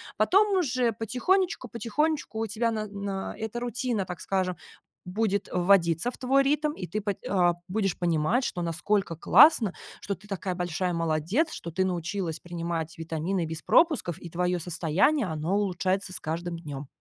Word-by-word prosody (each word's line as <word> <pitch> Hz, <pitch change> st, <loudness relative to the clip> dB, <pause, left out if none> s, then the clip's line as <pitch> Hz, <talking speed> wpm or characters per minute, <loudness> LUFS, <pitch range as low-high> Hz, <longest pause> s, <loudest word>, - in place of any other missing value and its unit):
Потом 390 Hz, -, +4 dB
уже 255 Hz, -9 st, +1 dB
потихонечку, 255 Hz, -, 0 dB
потихонечку 235 Hz, +3 st, -1 dB
у 225 Hz, -, 0 dB
тебя 225 Hz, +2 st, 0 dB
на 215 Hz, -1 st, -2 dB
на 200 Hz, -1 st, -4 dB
эта 220 Hz, +2 st, -4 dB
рутина, 240 Hz, -3 st, -2 dB
так 180 Hz, -1 st, -7 dB
скажем, 185 Hz, -2 st, -1 dB, 0.5 s
будет 200 Hz, +1 st, -1 dB
вводиться 180 Hz, +3 st, +3 dB
в -, -, -13 dB
твой 270 Hz, +1 st, +3 dB
ритм, 300 Hz, +2 st, +1 dB
и 185 Hz, -, -6 dB
ты 215 Hz, +6 st, -3 dB
пат 205 Hz, -2 st, -2 dB
э, 180 Hz, -3 st, +3 dB
будешь 195 Hz, -2 st, -1 dB
понимать, 175 Hz, -, +1 dB
что 175 Hz, -, -3 dB
насколько 170 Hz, +1 st, -1 dB
классно, 225 Hz, -, +6 dB, 0.3 s
что 200 Hz, -, -3 dB
ты 205 Hz, +3 st, -19 dB
такая 190 Hz, -2 st, -3 dB
большая 180 Hz, 0 st, -1 dB
молодец, 165 Hz, -, 0 dB
что 170 Hz, -, -7 dB
ты 185 Hz, +4 st, +1 dB
научилась 175 Hz, -1 st, -2 dB
принимать 170 Hz, -2 st, -4 dB
витамины 165 Hz, +3 st, -2 dB
без 160 Hz, 0 st, -5 dB
пропусков, 305 Hz, -, +3 dB
и 170 Hz, -, -9 dB
твое 180 Hz, +1 st, 0 dB
состояние, 175 Hz, -, +1 dB
оно 160 Hz, +4 st, -1 dB
улучшается 190 Hz, -1 st, -1 dB
с -, -, -6 dB
каждым 170 Hz, +2 st, -3 dB
днем. 145 Hz, -4 st, -7 dB
190 Hz, 160 wpm, -27 LUFS, 170-230 Hz, 0.5 s, классно